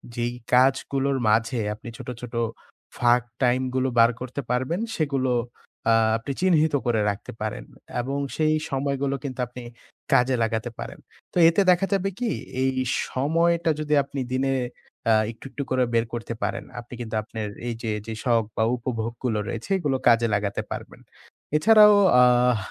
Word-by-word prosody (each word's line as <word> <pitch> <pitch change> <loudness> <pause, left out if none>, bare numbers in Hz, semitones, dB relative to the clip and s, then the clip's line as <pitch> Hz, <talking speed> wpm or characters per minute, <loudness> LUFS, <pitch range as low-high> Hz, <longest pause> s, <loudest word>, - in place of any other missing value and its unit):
যেই 120 0 -1 0.2
কাজগুলোর 135 +1 +2
মাঝে 115 +2 +2 0.2
আপনি 120 +3 -10
ছোট, 130 - -10
ছোট 125 -1 -8 0.6
ফাঁক 120 0 +4 0.2
টাইম 125 +1 +3
গুলো 130 0 +1
বার 115 - +7
করতে 130 +2 -4
পারবেন, 130 +8 0 0.2
সেগুলো 135 -5 0 0.6
আ - - +6 0.2
আপনি 115 +5 -5
চিহ্নিত 160 -4 +3
করে 115 -3 +2
রাখতে 100 +2 -5
পারেন। 110 -1 -3 0.4
এবং 135 +3 -3 0.2
সেই 155 0 +2
সময়গুলো 140 0 -1
কিন্তু 130 -3 -6
আপনি 125 +1 -10 0.5
কাজে 125 +1 +4
লাগাতে 115 +1 -1
পারেন। - - -7 0.3
তো - - -3
এতে 185 +4 +2
দেখা 180 +2 +2
যাবে 195 0 +1
কি? 240 -3 0 0.3
এই 130 - +2 0.4
সময়টা 165 +5 +1
যদি 150 0 -1
আপনি 140 0 -6
দিনে 135 +1 +1 0.6
আ - - +6 0.2
একটু, 115 - -15
একটু 140 +2 -4
করে 130 0 +2
বের 115 0 +2
করতে 115 0 -4
পারেন, - - -2 0.2
আপনি 120 +1 -11
কিন্তু 115 -2 -5
আপনের 110 -1 -5 0.2
এই 120 - -1
যে, 115 - -2
যে 115 - -5
শখ 115 -3 +3
বা 110 - +3
উপভোগগুলো 115 -1 -3
রয়েছে, 115 - -5
এগুলো 145 -7 0
কাজে 115 -1 +5
লাগাতে 100 0 -1
পারবেন। - - -7 0.6
এছাড়াও 210 +4 +7 0.3
আহ 125 -1 +4
130 Hz, 160 wpm, -24 LUFS, 115-140 Hz, 0.6 s, বার